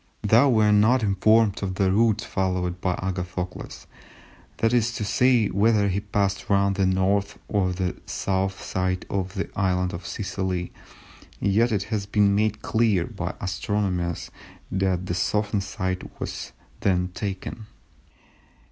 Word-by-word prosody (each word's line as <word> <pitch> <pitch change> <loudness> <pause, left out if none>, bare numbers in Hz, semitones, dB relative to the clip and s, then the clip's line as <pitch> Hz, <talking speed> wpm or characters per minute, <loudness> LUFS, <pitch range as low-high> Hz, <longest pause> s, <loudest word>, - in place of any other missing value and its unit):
Though 115 +6 +5
we 110 -4 +4
are 105 - +4
not 110 +4 +4
informed 105 +1 +3
of 95 -2 -2
the 95 -1 +2
route 110 +1 +3
followed 90 -2 -2
by 90 -2 0
Agathocles, 90 -1 -5 0.7
that 115 +1 +2
is 120 -1 +2
to 110 - -3
say 120 0 +3
whether 105 0 +3
he 95 +1 0
passed 100 -2 -1
round 100 -1 +3
the 95 -1 +2
North 95 +2 +1
or 95 -3 +1
the 90 0 -2
South 95 0 -1
side 95 0 -1
of 95 0 -2
the 95 - -2
island 90 -2 0
of 85 +1 -6
Sicily, 95 -3 -3 0.7
yet 110 +4 +2
it 100 -3 0
has 100 -2 -1
been 100 -1 +3
made 105 +1 0
clear 110 -6 +2
by - - -5
astronomers 90 -2 -2 0.4
that 95 -1 0
the 90 - -2
southern 105 +3 0
side 95 -1 -3
was - - -5 0.3
that 90 -1 +1
taken. 105 +2 -5
100 Hz, 145 wpm, -25 LUFS, 95-105 Hz, 0.7 s, Though